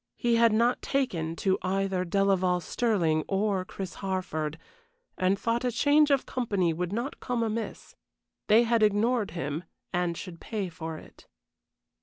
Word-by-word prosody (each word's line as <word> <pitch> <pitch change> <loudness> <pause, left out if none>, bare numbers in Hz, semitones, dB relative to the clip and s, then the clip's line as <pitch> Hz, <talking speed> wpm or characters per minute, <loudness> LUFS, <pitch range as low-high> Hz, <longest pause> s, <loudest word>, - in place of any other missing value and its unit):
He 235 -1 +2
had 230 -1 +5
not 235 +3 +2
taken 170 - -1
to 190 +2 +1
either 190 0 0
Delaval 185 -1 +2
Stirling 170 -6 +1
or 195 -1 0
Chris 185 0 -7
Harford, 160 -5 -2 0.6
and 185 +2 +2
thought 230 +3 -1
a 250 - +1
change 290 +5 +4
of 275 -2 +2
company 200 -9 0
would 175 +2 -3
not 235 +7 -3
come 245 -2 -1
amiss. 225 0 -4 0.5
They 220 +3 +6
had 235 -1 +2
ignored 215 +2 +2
him, 150 +2 -3 0.3
and 175 -2 0
should 175 -4 -8
pay 205 -5 -3
for 160 -1 -6
it. - - -15
195 Hz, 150 wpm, -28 LUFS, 180-230 Hz, 0.6 s, They